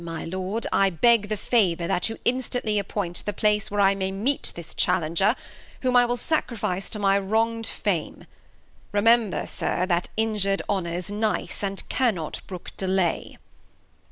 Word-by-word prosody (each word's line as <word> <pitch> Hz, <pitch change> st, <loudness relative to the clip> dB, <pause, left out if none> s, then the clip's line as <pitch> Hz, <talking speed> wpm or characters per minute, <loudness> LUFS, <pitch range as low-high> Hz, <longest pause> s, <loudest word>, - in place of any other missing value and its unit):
My 165 Hz, -1 st, -5 dB
Lord, 190 Hz, +6 st, -3 dB
I 195 Hz, 0 st, +4 dB
beg 210 Hz, +4 st, +3 dB
The 215 Hz, -, -1 dB
Favour 185 Hz, -7 st, +2 dB
that 175 Hz, +4 st, 0 dB
you'd 225 Hz, -, -6 dB
instantly 240 Hz, -4 st, 0 dB
appoint 195 Hz, -3 st, -3 dB
The 205 Hz, -, -3 dB
Place 210 Hz, 0 st, +1 dB
where 205 Hz, -, -2 dB
I 195 Hz, 0 st, +5 dB
may 190 Hz, -1 st, -2 dB
meet 225 Hz, +9 st, 0 dB
this 170 Hz, -1 st, -8 dB
Challenger, 180 Hz, +5 st, +2 dB, 0.5 s
Whom 255 Hz, -1 st, +1 dB
I 245 Hz, 0 st, +6 dB
will 245 Hz, +1 st, 0 dB
sacrifice 225 Hz, -, -1 dB
to -, -, -5 dB
my 200 Hz, -1 st, +3 dB
wrong' 225 Hz, +3 st, 0 dB
d 225 Hz, -, -1 dB
Fame; -, -, -2 dB, 0.7 s
Remember, 220 Hz, -2 st, +3 dB
Sir, 180 Hz, -, -1 dB
that 175 Hz, -1 st, 0 dB
injur'd 210 Hz, -3 st, +1 dB
Honour's 180 Hz, -1 st, -2 dB
nice. 215 Hz, +1 st, -1 dB
And 195 Hz, -1 st, -3 dB
cannot 210 Hz, -, -1 dB
brook 180 Hz, -2 st, -8 dB
delay. 190 Hz, -2 st, 0 dB
200 Hz, 155 wpm, -25 LUFS, 185-225 Hz, 0.7 s, I